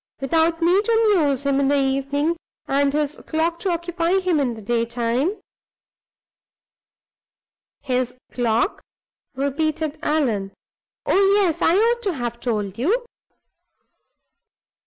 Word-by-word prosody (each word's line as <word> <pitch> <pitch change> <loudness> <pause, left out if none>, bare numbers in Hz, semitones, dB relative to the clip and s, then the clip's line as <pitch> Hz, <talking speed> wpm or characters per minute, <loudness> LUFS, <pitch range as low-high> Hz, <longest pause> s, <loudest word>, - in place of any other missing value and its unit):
Without 325 +4 +1
me 360 +4 +4
to 450 -1 +3
amuse 285 -5 +1
him 280 0 +2
in 275 - +2
the 285 +1 +3
evening, 275 +4 0 0.3
and 280 0 +2
his 300 0 -1
clock 330 +1 0
to 390 - -2
occupy 345 +1 0
him 365 -4 +1
in 250 -4 0
the 220 - -10
daytime 235 - -1 0.8
" - - -74 1.5
"His 250 -2 -1 0.2
clock?" 235 - 0 0.5
repeated 305 +3 -2
Allan. 240 -12 0 0.5
"Oh, 390 - +3
yes! 380 -6 +1
I 335 - +4
ought 470 +3 +2
to 400 -5 -1
have 240 -4 -4
told 210 -4 -3
you. 440 - +1
290 Hz, 120 wpm, -22 LUFS, 255-340 Hz, 1.5 s, me